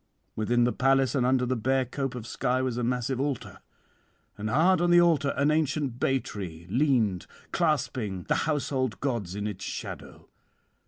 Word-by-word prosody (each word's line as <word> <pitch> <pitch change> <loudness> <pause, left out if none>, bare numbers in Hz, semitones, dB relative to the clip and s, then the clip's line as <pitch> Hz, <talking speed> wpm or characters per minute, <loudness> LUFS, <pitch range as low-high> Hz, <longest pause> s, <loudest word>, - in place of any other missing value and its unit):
'Within 120 +3 +2
the 120 - +2
palace 135 0 +2
and 125 -3 +2
under 130 -1 +2
the 130 +1 0
bare 130 +3 +1
cope 135 +1 -4
of 120 -3 -6
sky 125 +1 -1
was 130 -2 -1
a 120 - -2
massive 125 +2 -1
altar, 140 -3 -3 0.8
and 105 +1 -4
hard 170 +9 +3
on 175 - +2
the 175 0 +7
altar 160 -5 +3
an 145 +2 +3
ancient 150 -5 0
bay 135 0 +2
tree 90 -9 -7
leaned 120 - +1 0.2
clasping 125 - -1
the 160 - 0
household 135 -6 -1
gods 115 -10 -2
in 105 0 -3
its 100 -3 -5
shadow. - - -7
130 Hz, 170 wpm, -27 LUFS, 115-140 Hz, 0.8 s, the